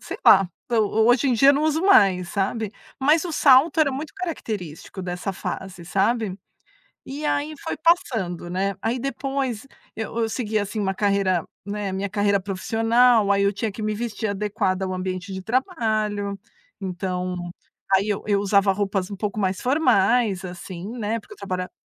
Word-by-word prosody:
sei - - -7
lá, 195 -1 +7 0.2
eu 235 - +1
eu 220 - +4 0.2
hoje 245 +3 +4
em - - +3
dia 275 +5 +6
não 285 +1 0
uso 315 +2 +1
mais, 195 - +5
sabe. 210 +1 -2 0.3
Mas 300 +5 +3
o 345 - -4
salto 295 +3 +5
era 285 -3 +3
muito 280 +3 -5
característico 215 - -5
dessa 180 +2 -3
fase, 190 -1 -6
sabe. 200 +2 0 0.7
E 285 +3 -6
aí 300 +1 -1
foi 330 - -3
passando, 195 - +1
né, 195 +2 -1
aí 235 +3 0
depois 270 -2 -3 0.3
eu 220 +1 -4
eu 225 - +1
segui, 220 -2 -1
assim, 205 +1 -3
uma 190 -2 0
carreira, 195 -3 +1 0.2
né, 205 0 -3
a - - -6
minha 195 +1 -2
carreira 205 -1 +2
profissional, 225 +3 +3
aí 200 0 +2
eu 200 - +2
tinha 210 +1 -3
que 215 - -7
me 215 0 -1
vestir 225 0 -3
adequada 195 -2 -1
ao 185 - -3
ambiente 185 +1 -4
de 190 - -5
trabalho, 215 - -1 0.4
então 180 -1 -3 0.6
aí 195 +2 +2
eu 205 - -1
eu 200 -1 +2
usava 200 0 +3
roupas 195 -1 -1
uma 200 - -5
pouco 210 0 -2
mais 190 -1 0
formais, 240 - +2
assim, 180 +1 -7
né, 220 +1 -1
porque - - -16
eu - - -26
trabalhava 185 -2 -4
205 Hz, 175 wpm, -23 LUFS, 190-245 Hz, 0.7 s, lá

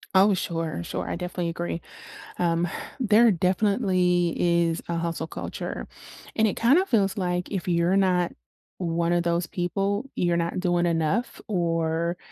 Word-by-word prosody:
Oh, 195 +1 +6
sure, 165 - -3
sure, - - -4
I - - -2
definitely 180 0 -3
agree, 170 0 -4 0.6
um, 170 0 +1 0.3
there 230 0 +5
definitely 180 -2 +2
is 170 -1 +2
a 170 - 0
hustle 165 -1 -2
culture, - - -5 0.5
and 220 - +3
it - - -2
kinda 285 +12 +4
feels 205 - +1
like 180 -2 -1
if 195 -4 -3
you're 170 +1 +2
not 180 -3 +2 0.4
one 170 -1 0
of 175 0 +2
those 170 0 0
people, 195 +7 -2
you're 175 -1 +1
not 170 +1 -1
doing 175 -1 +1
enough 170 +8 0
or 170 -2 0
175 Hz, 145 wpm, -25 LUFS, 170-195 Hz, 0.6 s, Oh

